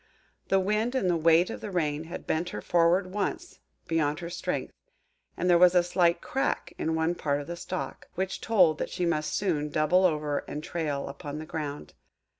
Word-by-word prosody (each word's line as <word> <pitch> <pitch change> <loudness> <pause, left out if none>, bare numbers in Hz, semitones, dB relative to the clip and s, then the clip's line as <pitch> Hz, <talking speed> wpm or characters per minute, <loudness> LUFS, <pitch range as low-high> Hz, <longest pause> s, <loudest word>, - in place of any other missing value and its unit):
The 195 - +3
Wind 215 +6 0
and 225 -8 +1
the - - +2
weight 165 +2 +4
of - - -7
rain 160 -6 -1
had 170 - -7
bent 165 +3 -1
her - - -5
forward 175 +2 +3
once, 335 - -3 0.3
beyond 155 -2 +1
her 170 +1 -6
strength, - - -3 0.6
and 180 - -1
there 175 -1 +5
was 180 0 +6
a 175 - +6
slight 175 -1 +2
crack 270 - -2
in 160 0 0
one 160 +1 +1
part 145 -4 -1
of 145 - -6
the 170 - -5
stalk, 180 +1 -5
which 190 +1 -2
told 180 -9 +4
that - - -2
she 180 - -2
must 155 -3 0
soon 155 -7 0
double 155 +5 +3
over 150 -4 +1
and 150 +1 -5
trail 155 -5 -3
upon 145 +1 -7
the 155 - -6
ground. 150 -2 -5
170 Hz, 195 wpm, -28 LUFS, 155-185 Hz, 0.6 s, was